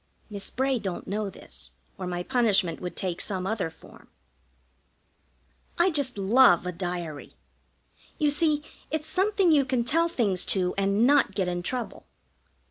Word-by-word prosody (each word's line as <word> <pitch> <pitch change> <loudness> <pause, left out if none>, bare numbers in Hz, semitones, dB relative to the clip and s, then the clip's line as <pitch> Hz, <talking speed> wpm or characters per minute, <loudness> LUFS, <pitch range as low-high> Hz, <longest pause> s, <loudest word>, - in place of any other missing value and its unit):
Miss 200 -1 -5
Bray 265 -1 0
don't 190 -4 -5
know 205 0 -2
this, - - -8 0.2
or 185 - -5
my 175 0 -3
punishment 205 -9 +2
would 180 -1 -5
take 180 -2 -2
some 185 -3 -3
other 195 -4 -1
form. 160 - -17 1.7
I 350 +2 +4
just 280 -7 -2
love 200 -2 +5
a 180 - -2
diary. 175 -4 -5 0.8
You 300 -3 +2
see, 300 0 +1 0.3
its 310 -1 -2
something 380 +2 +2
you 290 -3 +5
can 260 -2 0
tell 330 +7 +2
things 205 - 0
to 180 -2 +1
and 200 +3 +2
not 275 -7 +4
get 190 -3 0
in 175 0 -2
trouble. 235 +3 -4
210 Hz, 150 wpm, -27 LUFS, 180-280 Hz, 1.7 s, love